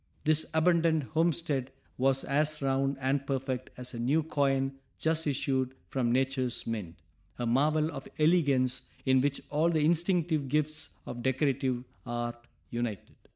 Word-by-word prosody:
This 155 0 +3
abandoned 165 -1 +3
homestead 150 -1 0 0.2
was 135 +1 +2
as 150 +2 +1
round 135 0 0
and 135 +1 0
perfect 130 -2 -2
as 125 0 -5
a 120 - -5
new 140 +7 +2
coin 135 -3 0 0.2
just 160 0 0
issued 130 -2 0
from 125 -3 0
nature's 130 -1 0
mint, 105 -7 -4 0.4
a 120 - -2
marvel 150 +6 +2
of 135 - -7
elegance 140 -6 +3 0.2
in 130 -1 +4
which 145 +1 0
all 155 +3 +3
the 155 -3 +2
instinctive 170 -3 +2
gifts 150 +1 -1
of 120 - -6
decorative 130 -1 0 0.2
art 120 0 -4 0.2
united. 120 -5 -4
135 Hz, 140 wpm, -30 LUFS, 130-155 Hz, 0.4 s, in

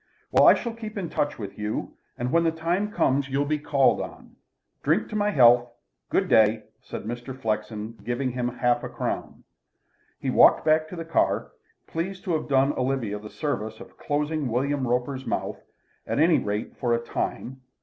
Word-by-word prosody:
Well, - - +6
I - - +9
shall 235 -1 -4
keep 220 -2 -8
in 180 -5 -4
touch 145 0 -1
with 100 -1 -7
you, 105 0 -3 0.2
and 125 +1 -2
when 170 +2 +4
the 165 - +3
time 175 +6 -1
comes 140 - +1
you'll 140 +2 0
be 150 +1 0
called 140 -2 +3
on. - - -9 0.5
Drink 165 +9 +1
my 210 -1 +1
health. 120 -7 +5 0.4
Good - - +1
day," 110 0 +4 0.2
said - - -7
Mr. 120 +4 -6
Flexen, 110 -1 -3
giving 125 +2 -1
him 125 0 -2
half 120 0 +1
a - - -4
crown. - - -4 0.8
He - - -1
walked - - +6
back 155 0 +3
to 180 - -8
the 165 -1 -6
car, 165 - +1 0.3
pleased 185 +4 -4
to 185 -5 -1
have 155 -2 -2
done 135 +1 +3
Olivia 125 -5 -1
the 105 0 -10
service 110 -7 -3
of - - -13
closing 150 0 -1
William 130 +3 0
Roper's 125 +2 -1
mouth, - - -2 0.5
at - - -1
any 160 +3 +5
rate 105 +1 -3
for 120 -3 +1
a - - -1
time. 130 +2 -4
135 Hz, 180 wpm, -25 LUFS, 120-160 Hz, 0.8 s, I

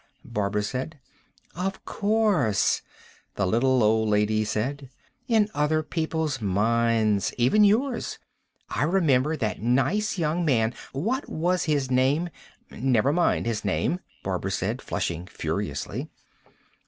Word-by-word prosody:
Barbara 105 0 -1
said. 130 +8 -4 0.5
"Of 190 +2 -4
course," 200 - +2 0.5
the 100 - 0
little 125 +5 +3
old 110 0 +3
lady 105 +1 +2
said. 130 +6 -3 0.4
"In 220 -4 +3
other 155 +1 +1
people's 160 -4 -2
minds. 110 +1 +1
Even 130 - +4
yours. 230 +5 +1 0.5
I - - -3
remember 155 -3 +2
that 105 -7 -2
nice 155 - +1
young 165 +1 0
man... 120 -7 +2 0.2
what 225 - -2
was 175 +3 0
his 145 -5 0
name?" 140 +7 +2 0.4
"Never 130 +2 +1
mind 175 -7 +2
his 115 -2 -2
name," 180 - 0 0.2
Barbara - - -2
said, - - -2
flushing 85 +1 -3
furiously. - - -4
135 Hz, 115 wpm, -26 LUFS, 110-170 Hz, 0.5 s, Even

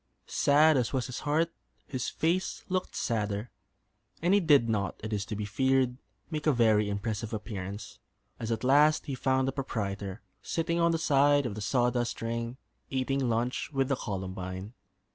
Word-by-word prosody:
Sad 150 +1 +4
as 125 0 0
was 130 -2 0
his 125 -1 -5
heart, 160 +3 +1 0.3
his 130 -3 -3
face 175 +4 -1
looked 185 0 -2
sadder; 105 0 -1 0.7
and 175 +3 +2
he 205 - +6
did 145 -9 +5
not, 105 -4 -1
it 110 0 -3
is 100 -1 -1
to 105 0 -4
be 105 0 -3
feared, 130 +4 +2 0.4
make 155 0 -2
a - - +6
very 110 -5 +3
impressive 105 +2 -3
appearance, 100 -2 -6 0.4
as 115 0 -3
at 115 - -1
last 145 +4 +5
he 140 - -4
found 130 0 +1
the - - +1
proprietor 100 -7 -4 0.2
sitting 170 +1 -1
on 170 0 +4
the 165 - +2
side 145 -2 +4
of 120 - -2
the 105 - -6
sawdust 120 +3 +1
ring, 115 +2 -3 0.3
eating 135 -1 0
lunch 120 +6 -1
with 135 -2 0
the 135 - +2
Columbine. 95 -1 -5
125 Hz, 170 wpm, -29 LUFS, 105-145 Hz, 0.7 s, he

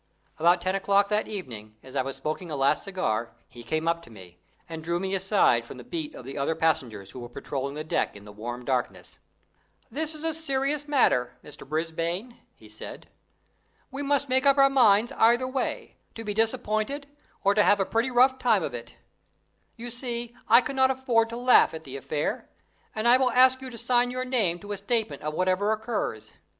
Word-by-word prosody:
About 175 +2 +4
ten 185 +1 0
o'clock 200 +1 +2
that 210 0 0
evening, 115 - -7
as 130 +1 -13
I 135 - +2
was 135 +1 -5
smoking 155 +3 -4
a 150 - -3
last 135 0 +2
cigar, 120 - -2
he 120 - -13
came 155 +7 -2
up 170 0 +1
to 170 - -16
me, 90 -5 -14 0.3
and 160 -1 -7
drew 170 +1 -1
me 190 +1 -3
aside 190 - +3
from 115 - -10
the 125 - -10
beat 160 +1 -5
of 125 - -10
the 135 +2 -6
other 140 +4 0
passengers 120 -12 -1
who 125 - -9
were 120 -1 -8
patrolling 140 +3 -5
the 155 - -4
deck 155 - -1
in 100 0 -12
the 105 - -11
warm 120 +4 -7
darkness. 130 -2 -3 0.7
"This 310 +5 -3
is 305 - -9
a 325 0 0
serious 290 -1 -2
matter, 125 - +2
Mr. 150 -2 -12
Brisbane," 165 +8 -3 0.2
he - - -17
said. - - -10 0.8
"We 275 +2 -5
must 285 0 +1
make 260 0 +2
up 275 0 +5
our 275 0 +6
minds 230 -4 +4
either 240 +3 +3
way 260 -1 -3 0.2
to 225 - -6
be 210 -1 -3
disappointed 225 +4 -1 0.4
or 200 - +4
to 210 - +4
have 205 0 +4
a 195 - +2
pretty 230 +5 0
rough 260 +1 +4
time 220 -8 +3
of 140 - -4
it. 120 -1 -8 0.8
You 240 +1 -7
see 240 -1 -4
I 235 +2 +7
cannot 265 +1 +2
afford 245 -4 +1
to 230 - -5
laugh 245 -8 +5
at 160 - -8
the 135 -3 -9
affair, 145 +2 -3 0.5
and 215 +2 0
I 245 +1 +7
will 260 -1 +2
ask 255 +1 +5
you 260 - -6
to 235 - -9
sign 245 +1 +2
your 255 +1 -3
name 220 -10 +1
to 205 - -8
a 205 - -2
statement 220 - -1
of 155 +1 -4
whatever 185 +4 +1
occurs. 220 - -3
200 Hz, 205 wpm, -26 LUFS, 150-250 Hz, 0.8 s, I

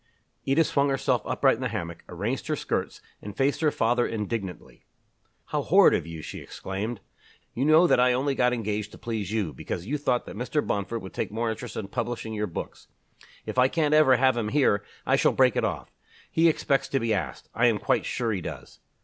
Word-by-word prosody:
Edith 140 +4 +3
swung 140 -1 +1
herself 130 -3 +1
upright 135 -4 +2
in - - -9
the 125 - 0
hammock, 85 -8 -5
arranged 105 - -3
her 155 - 0
skirts, - - -3 0.2
and 105 -1 -9
faced 140 +3 +1
her 155 - +4
father 120 -2 +1
indignantly. 105 -4 -5 0.7
"How - - 0
horrid - - +6
of - - -1
you!" 80 -2 -7
she - - -7
exclaimed. 100 +3 -5 0.5
"You 130 - -1
know 155 +3 +6
that 170 - +4
I 125 0 +5
only 135 +3 0
got 125 -2 +2
engaged 105 -3 -2
to - - -10
please 110 -4 -4
you, 105 -8 -1
because 85 +7 -5
you 145 +7 -2
thought 125 -4 0
that - - -9
Mr. 125 +7 -1
Bomford 100 +3 -2
would 95 - -9
take - - -2
more 115 +1 -1
interest 110 - -7
in 105 - -4
publishing 120 0 -4
your 105 0 -2
books. 85 - -7 0.6
If - - -2
I 125 - +6
can't 150 +1 +1
ever 150 -4 +6
have 130 0 +3
him 115 -3 -1
here, 125 -8 +2 0.2
I - - +3
shall - - +3
break - - +4
it - - +1
off. - - -3 0.4
He 165 +1 +4
expects 140 -3 0
to 135 - 0
be 115 -2 0
asked 80 -11 -4
I 120 +2 +3
am 115 -3 +2
quite - - +1
sure 120 -3 -1
he 100 -4 -2
does." - - -8
120 Hz, 215 wpm, -26 LUFS, 105-135 Hz, 0.7 s, horrid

